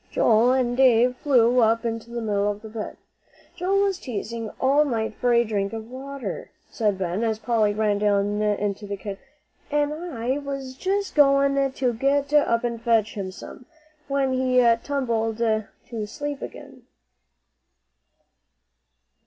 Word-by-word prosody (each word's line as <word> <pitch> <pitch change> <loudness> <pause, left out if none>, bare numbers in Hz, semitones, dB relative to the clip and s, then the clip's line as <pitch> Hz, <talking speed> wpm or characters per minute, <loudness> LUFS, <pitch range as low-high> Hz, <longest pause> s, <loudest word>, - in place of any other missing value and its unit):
Joel 230 +3 +4
and 245 -2 +1
David 250 -1 +4
flew 250 -3 +3
up 230 0 +3
into 230 0 -3
the 235 -1 -4
middle 205 -1 0
of 205 +1 -5
the 220 - -8
bed. 215 -1 -6 0.6
"Joe 380 +3 +1
was 390 -2 0
teasing 230 - -5
all 275 +3 +4
night 225 -6 -2
for 245 +3 0
a 235 0 +5
drink 205 -2 -2
of 225 +1 -7
water," 275 - -6 0.2
said 210 -4 0
Ben, 185 +3 -2
as 220 -2 0
Polly 220 -2 +1
ran 210 -1 +1
down 205 0 +1
into 205 -1 -1
the 200 0 -4
kitchen. 200 +3 -7 0.5
"An' 295 0 +1
I 280 -5 -3
was 275 -2 -5
just 390 +8 -2
going 275 -1 +4
to 255 -2 -1
get 275 +4 0
up 240 -6 +3
and 235 -1 -3
fetch 225 -2 +2
him 195 -2 -4
some, 200 +6 -11 0.4
when 275 -1 0
he 255 -1 +2 0.2
tumbled 230 -6 -1
to 220 -2 0 0.4
sleep 290 +5 -5
again." - - -10
235 Hz, 150 wpm, -24 LUFS, 215-275 Hz, 0.6 s, a